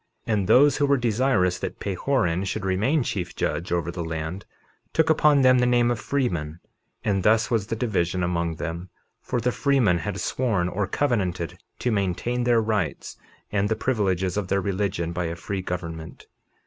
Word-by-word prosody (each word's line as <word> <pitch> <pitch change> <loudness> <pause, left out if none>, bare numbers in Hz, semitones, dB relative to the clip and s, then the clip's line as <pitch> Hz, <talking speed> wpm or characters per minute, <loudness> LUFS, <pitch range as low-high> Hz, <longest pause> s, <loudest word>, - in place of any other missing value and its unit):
51:6 115 - +1
And 100 -3 0
those 145 +5 +6
who 145 - +2
were 140 0 +4
desirous 115 -6 +1
that - - -5
Pahoran 95 -3 0
should 100 +1 -3
remain 110 +11 +1
chief 90 -6 -4
judge 85 - -2
over 85 -1 0
the 85 -1 -4
land 80 +3 -4 0.5
took 160 0 +3
upon 150 -3 +4
them 130 -1 +6
the 125 - +3
name 120 -1 +3
of 120 - -2
freemen; 85 - -2 0.5
and 100 -2 +1
thus 110 +5 +3
was 110 -4 +1
the 115 - -2
division 95 -6 0
among 85 -2 -1
them, 85 +3 -5 0.3
for 125 - -2
the 125 +2 +1
freemen 125 -11 +2
had 80 - -4
sworn 110 -9 0
or 95 +2 -2
covenanted 95 - -1 0.2
to 125 - -1
maintain 110 +5 -1
their 120 -2 +3
rights 105 -9 -2 0.4
and 105 0 +1
the 110 - +1
privileges 95 -7 0
of 100 -3 -1
their 100 - +1
religion 95 -3 -2
by 90 0 -2
a 85 0 -3
free 95 +2 -4
government. 85 -3 -6
100 Hz, 180 wpm, -25 LUFS, 90-120 Hz, 0.5 s, those